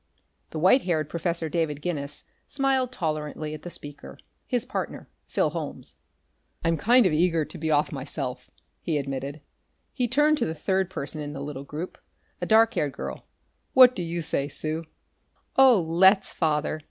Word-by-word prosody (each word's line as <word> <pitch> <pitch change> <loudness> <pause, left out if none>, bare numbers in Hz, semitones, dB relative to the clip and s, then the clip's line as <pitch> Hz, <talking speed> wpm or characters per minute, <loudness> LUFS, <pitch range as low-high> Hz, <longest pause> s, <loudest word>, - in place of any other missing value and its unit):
The - - -6
white 185 - +5
haired 160 -6 -1
Professor 170 0 -2
David 155 -3 -1
Guinness 145 -3 -4 0.2
smiled 270 -2 +1
tolerantly 155 - -3
at 155 - -7
the 175 - -7
speaker, 145 -3 -9 0.3
his 245 -2 0
partner, 265 - -5 0.2
Phil - - +1
Holmes. - - -6 0.7
"I'm 165 0 +2
kind 235 +8 +5
of 180 - +3
eager 165 -1 +2
to - - -10
be 160 0 -2
off, 150 -1 +2
myself," 135 -3 -5 0.3
he 160 -3 -1
admitted. 140 +1 -4 0.5
He 250 -3 0
turned 295 +4 +3
to - - +1
the 160 - -3
third 190 +3 0
person 155 -3 -5
in 145 0 -5
the 140 - -6
little 140 -1 -6
group, 155 +6 -6 0.4
a - - -2
dark 225 +1 +5
haired 145 - -1
girl. - - -7 0.5
"What 255 -1 +8
do - - -3
you 170 0 -3
say, 140 -3 0
Sue?" 155 +2 -3 0.7
"Oh, 260 -5 +7
let's, 190 +4 +4
Father!" 155 -1 0
165 Hz, 165 wpm, -26 LUFS, 150-190 Hz, 0.7 s, What